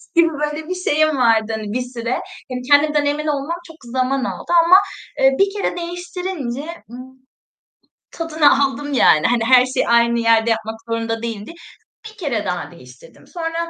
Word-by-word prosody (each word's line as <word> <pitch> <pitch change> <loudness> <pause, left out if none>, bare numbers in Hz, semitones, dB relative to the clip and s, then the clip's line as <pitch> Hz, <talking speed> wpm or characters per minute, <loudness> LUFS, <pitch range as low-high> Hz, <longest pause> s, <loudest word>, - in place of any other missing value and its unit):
gibi, 335 0 +5
böyle, 300 +1 -4
bir 365 - -2
şeyim 310 -4 +1
vardı, 225 -2 +2
hani, 220 - -7
bir 250 - -1
süre. 240 -1 -5 0.4
Hani, 250 0 -4
kendimden 295 0 +4
emin 295 +2 -1
olmam 295 +3 -2
çok 325 - -13
zaman 255 +2 -1
aldı - - -6
ama, 355 +2 +7 0.4
eee, 270 0 +4
1 395 - +5
kere 405 -3 -2
değiştirince, 350 -6 -5 0.3
ımm, 260 +2 -11 0.9
tadını 310 -4 +2
aldım 285 +1 -3
yani, 155 - +4
hani, 235 -1 +1
her 255 0 +6
şeyi 255 - -1
aynı 235 0 +3
yerde 230 0 +3
yapmak 220 0 -2
zorunda 225 0 -2
değildir. 225 +5 -6 0.5
1 435 0 -15
kere 255 - -2
daha 180 -1 -4
değiştirdim. 130 -1 -17
Sonra, 335 0 -4
270 Hz, 160 wpm, -19 LUFS, 235-315 Hz, 0.9 s, ama